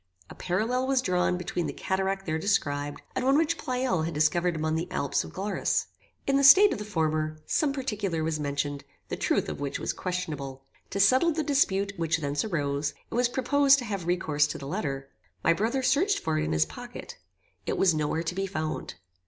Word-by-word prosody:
A -, -, -7 dB
parallel 225 Hz, +8 st, -1 dB
was 270 Hz, -1 st, +3 dB
drawn 180 Hz, -2 st, +1 dB
between 175 Hz, -1 st, -3 dB
the -, -, -4 dB
cataract 195 Hz, 0 st, -2 dB
there 160 Hz, -1 st, -1 dB
described, 145 Hz, -7 st, -1 dB
and -, -, -1 dB
one 270 Hz, +2 st, +4 dB
which 325 Hz, +1 st, +2 dB
Pleyel 250 Hz, -8 st, 0 dB
had 165 Hz, -1 st, -3 dB
discovered 170 Hz, +3 st, +2 dB
among 155 Hz, 0 st, -1 dB
the 165 Hz, +2 st, -2 dB
Alps 140 Hz, -6 st, 0 dB
of -, -, -10 dB
Glarus. 200 Hz, +2 st, -1 dB, 0.4 s
In 275 Hz, 0 st, +2 dB
the 275 Hz, -, +2 dB
state 380 Hz, +9 st, +8 dB
of -, -, -5 dB
the 210 Hz, -, -5 dB
former, 155 Hz, -5 st, -1 dB
some 300 Hz, -3 st, +1 dB
particular 210 Hz, -, -2 dB
was 160 Hz, -1 st, -1 dB
mentioned, 145 Hz, -1 st, -2 dB, 0.3 s
the -, -, -2 dB
truth -, -, 0 dB
of -, -, -5 dB
which 140 Hz, -1 st, -3 dB
was -, -, -2 dB
questionable. 145 Hz, -7 st, -4 dB, 0.2 s
To 195 Hz, -, -3 dB
settle 260 Hz, +12 st, +5 dB
the 315 Hz, 0 st, -1 dB
dispute 200 Hz, -9 st, +1 dB
which 165 Hz, 0 st, +1 dB
thence 145 Hz, -2 st, -1 dB
arose, 145 Hz, -6 st, -1 dB, 0.2 s
it -, -, -7 dB
was 245 Hz, 0 st, +2 dB
proposed 280 Hz, +2 st, +4 dB
to 250 Hz, -, -4 dB
have 200 Hz, -6 st, -4 dB
recourse 155 Hz, -5 st, +2 dB
to -, -, -5 dB
the 140 Hz, -, -8 dB
letter. 140 Hz, -6 st, -3 dB, 0.4 s
My 170 Hz, -, +5 dB
brother 230 Hz, +9 st, -1 dB
searched 385 Hz, +10 st, +3 dB
for 155 Hz, -1 st, -1 dB
it 155 Hz, -, 0 dB
in -, -, -2 dB
his 80 Hz, 0 st, +3 dB
pocket. 80 Hz, -, -9 dB, 0.5 s
It -, -, -1 dB
was 185 Hz, -3 st, +4 dB
no 155 Hz, -1 st, 0 dB
where 160 Hz, +2 st, -1 dB
to 170 Hz, -, -3 dB
be 195 Hz, +1 st, -2 dB
found. 155 Hz, -4 st, -4 dB
180 Hz, 210 wpm, -27 LUFS, 155-240 Hz, 0.5 s, state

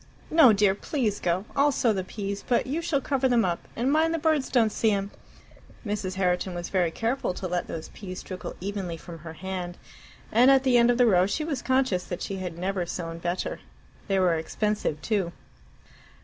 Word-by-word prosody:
"No, 315 Hz, -7 st, +8 dB
dear; 205 Hz, -2 st, +4 dB
please 220 Hz, -, -2 dB
go. 180 Hz, +3 st, 0 dB
I'll 285 Hz, +1 st, +4 dB
sow 235 Hz, -4 st, +2 dB
the 190 Hz, -2 st, -2 dB
peas, 200 Hz, +1 st, -5 dB
but 245 Hz, -, +2 dB
you 295 Hz, +6 st, -2 dB
shall 305 Hz, -5 st, 0 dB
cover 265 Hz, -2 st, +1 dB
them 235 Hz, -4 st, +3 dB
up 175 Hz, -2 st, -2 dB
and 250 Hz, +4 st, +1 dB
mind 320 Hz, +2 st, +3 dB
the -, -, 0 dB
birds 310 Hz, -3 st, +1 dB
don't 230 Hz, -4 st, +3 dB
see 220 Hz, -, +2 dB
'em!" 200 Hz, -1 st, -1 dB, 0.7 s
Mrs. 205 Hz, -3 st, -3 dB
Herriton 180 Hz, -1 st, 0 dB
was 175 Hz, 0 st, -4 dB
very 180 Hz, -3 st, +2 dB
careful 225 Hz, +1 st, -1 dB
to 185 Hz, -, -4 dB
let 175 Hz, 0 st, -2 dB
those 160 Hz, -1 st, -6 dB
peas 185 Hz, -3 st, -8 dB
trickle 185 Hz, -1 st, -7 dB
evenly 190 Hz, -3 st, -4 dB
from 165 Hz, 0 st, -10 dB
her 160 Hz, 0 st, -9 dB
hand, 180 Hz, 0 st, -5 dB, 0.5 s
and 245 Hz, +4 st, +6 dB
at 270 Hz, -1 st, +5 dB
the 260 Hz, -2 st, +3 dB
end 235 Hz, 0 st, +5 dB
of 240 Hz, -, +3 dB
the 250 Hz, -, +5 dB
row 185 Hz, -4 st, +4 dB
she 305 Hz, +9 st, -1 dB
was 300 Hz, -4 st, -3 dB
conscious 260 Hz, -9 st, +1 dB
that 175 Hz, -, -5 dB
she 195 Hz, -, -4 dB
had 180 Hz, -3 st, -5 dB
never 185 Hz, +1 st, -1 dB
sown 165 Hz, -1 st, -5 dB
better. 175 Hz, +2 st, -3 dB, 0.5 s
They 195 Hz, -2 st, +1 dB
were 185 Hz, -2 st, +3 dB
expensive 165 Hz, +1 st, -1 dB
too. 195 Hz, -6 st, 0 dB
200 Hz, 205 wpm, -26 LUFS, 180-250 Hz, 0.7 s, No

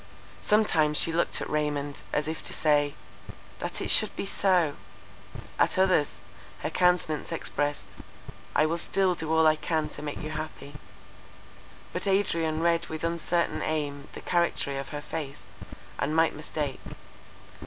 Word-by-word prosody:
Sometimes 160 Hz, -8 st, +3 dB
she 165 Hz, -, +3 dB
looked 170 Hz, -, +1 dB
at -, -, -3 dB
Raymond, 145 Hz, -1 st, -2 dB
as 150 Hz, 0 st, 0 dB
if 160 Hz, 0 st, -4 dB
to -, -, 0 dB
say—That 145 Hz, -2 st, -2 dB
it -, -, +2 dB
should -, -, +6 dB
be -, -, -3 dB
so! 180 Hz, -6 st, +2 dB, 0.9 s
At -, -, +3 dB
others 185 Hz, -6 st, +2 dB, 0.4 s
her -, -, -2 dB
countenance 180 Hz, -4 st, +2 dB
expressed—I 145 Hz, +1 st, -3 dB
will 165 Hz, +2 st, -1 dB
still 190 Hz, +1 st, +2 dB
do 160 Hz, -2 st, -4 dB
all 160 Hz, 0 st, +4 dB
I 155 Hz, 0 st, +6 dB
can 155 Hz, 0 st, -1 dB
to -, -, -9 dB
make 150 Hz, -1 st, -4 dB
you 155 Hz, -, -4 dB
happy. 155 Hz, -2 st, -6 dB, 1.2 s
But 180 Hz, +2 st, -2 dB
Adrian 165 Hz, -5 st, +1 dB
read 170 Hz, 0 st, +2 dB
with 160 Hz, 0 st, -6 dB
uncertain 170 Hz, +1 st, 0 dB
aim 145 Hz, -2 st, -2 dB
the -, -, -8 dB
charactery 170 Hz, -5 st, 0 dB
of 135 Hz, -, -6 dB
her 145 Hz, -1 st, -5 dB
face, 145 Hz, -2 st, -6 dB, 0.6 s
and 150 Hz, +2 st, 0 dB
might 165 Hz, 0 st, +4 dB
mistake. 150 Hz, -2 st, -4 dB
155 Hz, 145 wpm, -28 LUFS, 150-170 Hz, 1.2 s, should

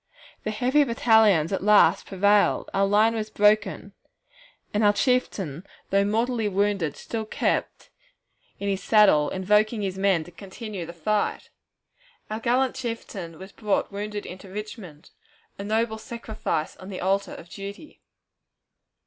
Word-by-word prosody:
The -, -, 0 dB
"heavy 255 Hz, +7 st, +2 dB
battalions" 220 Hz, -, +3 dB
at -, -, -1 dB
last 210 Hz, 0 st, +5 dB
prevailed, 205 Hz, +2 st, +2 dB
our 195 Hz, 0 st, +2 dB
line 215 Hz, +3 st, +4 dB
was 215 Hz, -1 st, -3 dB
broken, 210 Hz, 0 st, +1 dB, 0.8 s
and 210 Hz, +1 st, +1 dB
our 205 Hz, 0 st, +5 dB
chieftain, 195 Hz, -, 0 dB, 0.3 s
though 200 Hz, 0 st, +4 dB
mortally 225 Hz, +2 st, 0 dB
wounded, 195 Hz, -6 st, 0 dB
still 225 Hz, -1 st, -4 dB
kept 215 Hz, -, -2 dB, 0.7 s
in 200 Hz, -, -3 dB
his 195 Hz, -1 st, -1 dB
saddle, 195 Hz, -9 st, +4 dB
invoking 210 Hz, +3 st, +1 dB
his 190 Hz, -1 st, -3 dB
men 190 Hz, -4 st, +2 dB
to 175 Hz, -, -14 dB
continue 195 Hz, 0 st, -8 dB
the 170 Hz, -, -8 dB
fight. 205 Hz, +5 st, -1 dB, 0.8 s
Our 215 Hz, -, -2 dB
gallant 250 Hz, +3 st, +1 dB
chieftain 195 Hz, -8 st, -6 dB
was 190 Hz, +3 st, -11 dB
brought 210 Hz, -2 st, -1 dB
wounded 205 Hz, +1 st, -5 dB
into 185 Hz, +1 st, -10 dB
Richmond, 195 Hz, -6 st, -9 dB, 0.5 s
a -, -, -4 dB
noble 220 Hz, +1 st, -1 dB
sacrifice 220 Hz, -8 st, -4 dB
on 185 Hz, -, -11 dB
the 185 Hz, -, -6 dB
altar 195 Hz, +2 st, 0 dB
of -, -, -11 dB
duty. 200 Hz, -, -10 dB
205 Hz, 140 wpm, -25 LUFS, 190-220 Hz, 0.8 s, last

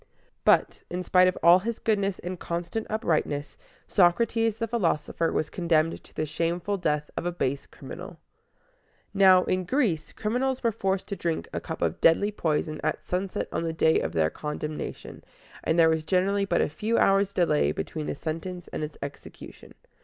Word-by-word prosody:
But, -, -, +3 dB
in 180 Hz, +1 st, -3 dB
spite 185 Hz, 0 st, +5 dB
of 185 Hz, -, 0 dB
all 175 Hz, +2 st, +8 dB
his 230 Hz, +4 st, -3 dB
goodness 200 Hz, -3 st, 0 dB
and 180 Hz, 0 st, -6 dB
constant 175 Hz, +6 st, -4 dB
uprightness, 155 Hz, -8 st, -1 dB, 0.3 s
Socrates 225 Hz, +4 st, +2 dB
the 230 Hz, 0 st, -2 dB
philosopher 170 Hz, -7 st, 0 dB
was 150 Hz, -, -1 dB
condemned 165 Hz, -2 st, +1 dB
to -, -, -20 dB
the 155 Hz, -, -1 dB
shameful 170 Hz, +6 st, -1 dB
death 150 Hz, -4 st, -1 dB
of 175 Hz, -, -2 dB
a -, -, 0 dB
base 140 Hz, -5 st, -2 dB
criminal. -, -, -10 dB, 1.0 s
Now, 190 Hz, -2 st, +6 dB
in 185 Hz, 0 st, 0 dB
Greece, 180 Hz, -, 0 dB
criminals 255 Hz, +4 st, -1 dB
were 230 Hz, -, +3 dB
forced 195 Hz, -3 st, -1 dB
to 200 Hz, -, -2 dB
drink 170 Hz, -4 st, -2 dB
a -, -, -1 dB
cup -, -, -5 dB
of -, -, -1 dB
deadly 200 Hz, +6 st, +4 dB
poison 155 Hz, -5 st, -1 dB
at 155 Hz, -, -2 dB
sunset 185 Hz, +3 st, -2 dB
on -, -, -1 dB
the 165 Hz, -1 st, -2 dB
day 160 Hz, 0 st, +3 dB
of 80 Hz, -, -3 dB
their 80 Hz, -1 st, +2 dB
condemnation, 150 Hz, 0 st, -6 dB, 0.4 s
and 160 Hz, -, +1 dB
there 165 Hz, -1 st, +6 dB
was 160 Hz, -1 st, 0 dB
generally 195 Hz, +4 st, +1 dB
but -, -, +1 dB
a -, -, +2 dB
few 215 Hz, +10 st, -1 dB
hours' 195 Hz, 0 st, +3 dB
delay 170 Hz, -6 st, +2 dB
between 155 Hz, -2 st, -4 dB
the -, -, -2 dB
sentence 175 Hz, +3 st, -5 dB
and 155 Hz, -, -4 dB
its 150 Hz, 0 st, -6 dB
execution. 140 Hz, -, -10 dB
175 Hz, 175 wpm, -27 LUFS, 160-200 Hz, 1.0 s, all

